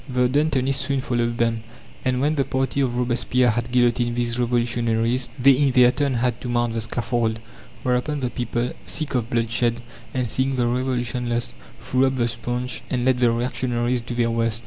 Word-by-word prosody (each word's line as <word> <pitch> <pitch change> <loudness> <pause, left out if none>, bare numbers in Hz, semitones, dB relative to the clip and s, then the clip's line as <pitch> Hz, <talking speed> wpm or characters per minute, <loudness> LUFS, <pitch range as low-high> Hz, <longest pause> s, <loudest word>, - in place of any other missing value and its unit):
The 125 -1 +2
Dantonists 135 -1 +1
soon 140 -1 0
followed 120 -2 -1
them; 115 -1 0 0.4
and 130 -1 0
when 150 +2 +2
the 140 -3 +1
party 135 +1 -1
of 125 -3 0
Robespierre 125 0 +2
had 120 +2 -3
guillotined 120 -1 +2
these 120 0 -1
revolutionaries, 120 0 0
they 135 +1 +6
in 135 +1 +3
their 125 -1 +5
turn 140 -1 0
had 120 0 0
to 125 - -5
mount 120 -1 0
the 115 - -2
scaffold; 115 -1 -1 0.5
whereupon 125 +4 0
the 125 -1 -2
people, 120 0 -2 0.2
sick 155 -3 -1
of 120 -3 -1
bloodshed, 115 0 +1 0.3
and 125 -2 -1
seeing 130 +4 +1
the 125 -2 +1
revolution 125 0 -1
lost, 120 - -1 0.3
threw 130 +1 +1
up 130 - -1
the 120 -2 +1
sponge, 120 +2 -3
and 125 -1 -1
let 130 -1 +3
the 120 -1 +4
reactionaries 120 0 -1
do 120 +1 -6
their 120 -1 +1
worst. 115 -1 0
125 Hz, 190 wpm, -23 LUFS, 120-130 Hz, 0.5 s, they